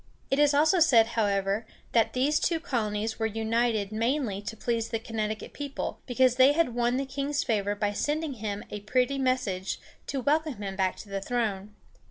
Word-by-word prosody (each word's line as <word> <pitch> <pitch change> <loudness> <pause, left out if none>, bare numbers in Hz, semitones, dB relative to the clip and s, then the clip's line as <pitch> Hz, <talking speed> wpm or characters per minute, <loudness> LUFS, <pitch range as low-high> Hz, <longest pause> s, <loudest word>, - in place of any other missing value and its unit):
It 270 - +2
is 295 -1 +4
also 315 +5 +4
said, 235 -9 +5
however, 200 -1 0 0.3
that 230 -2 +2
these 280 +4 +2
two 335 -2 +1
colonies 220 -7 -2
were 225 - +1
united 220 -1 0
mainly 230 -2 0
to 225 +2 -6
please 230 0 -1
the 225 - -1
Connecticut 220 -1 -4
people, 285 -1 -4
because 255 0 +3
they 265 +2 +7
had 320 -6 +1
won 240 +1 +1
the 275 - -1
king's 280 +2 -2
favor 205 -4 0
by 205 0 -1
sending 295 +6 -1
him 210 -3 -4
a 210 - -4
pretty 250 +6 0
message 240 -8 -1 0.3
to 275 - -2
welcome 305 +2 +1
him 195 -1 -4
back 190 -1 0
to 205 - -11
the 195 0 -3
throne. 210 -3 -2
230 Hz, 185 wpm, -28 LUFS, 210-275 Hz, 0.3 s, they